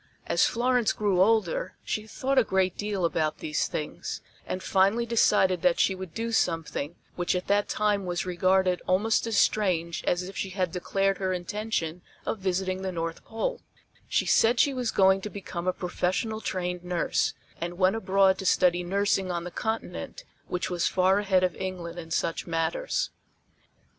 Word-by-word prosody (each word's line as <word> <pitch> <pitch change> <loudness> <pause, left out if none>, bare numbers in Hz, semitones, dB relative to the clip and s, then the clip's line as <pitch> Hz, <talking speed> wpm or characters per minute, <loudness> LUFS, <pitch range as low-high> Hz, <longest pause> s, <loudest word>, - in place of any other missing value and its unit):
As - - +3
Florence 245 -1 +2
grew 200 -4 +1
older 225 - +2
she 215 0 -3
thought 265 +4 +1
a - - +4
great 190 -3 +1
deal 205 -3 -1
about 155 -1 0
these 150 -1 -1
things, 150 - -4 0.3
and 185 - -3
finally 200 +5 +3
decided 210 -6 +3
that 180 -2 +3
she 195 - +3
would 185 -3 -8
do 230 +1 -2
something 165 -6 -1 0.2
which 175 +1 0
at 180 - -2
that 205 0 +1
time 205 -2 +1
was 175 0 -2
regarded 185 0 +2
almost 215 +5 +2
as 225 -2 0
strange 170 -7 +1
as 180 +1 +1
if 190 +2 -8
she 195 - -3
had 185 -2 -1
declared 195 +2 0
her 190 -1 0
intention 180 -2 -3 0.2
of 220 - -2
visiting 185 0 -1
the 190 -1 -2
North 165 -1 -4
Pole 225 - -3 0.5
she - - +1
said 235 +2 +4
she 280 +2 +4
was 250 -3 -1
going 190 -1 +4
to 210 - -5
become 185 -3 -6
a - - +4
professional 185 +5 -2
trained 180 -3 -3
nurse, 180 -1 0 0.2
and 175 +1 -4
went 185 +2 +3
abroad 195 -2 +3
to 190 - -5
study 180 -1 +3
nursing 195 +1 +1
on 170 -1 -2
the 175 - -6
Continent 225 - -4 0.2
which 180 - -2
was 175 -1 +1
far 190 +1 +3
ahead 190 -3 +2
of 180 -2 +1
England 175 -2 -5
in 165 -1 -8
such 165 +1 -1
matters. - - -1
190 Hz, 175 wpm, -27 LUFS, 180-210 Hz, 0.5 s, a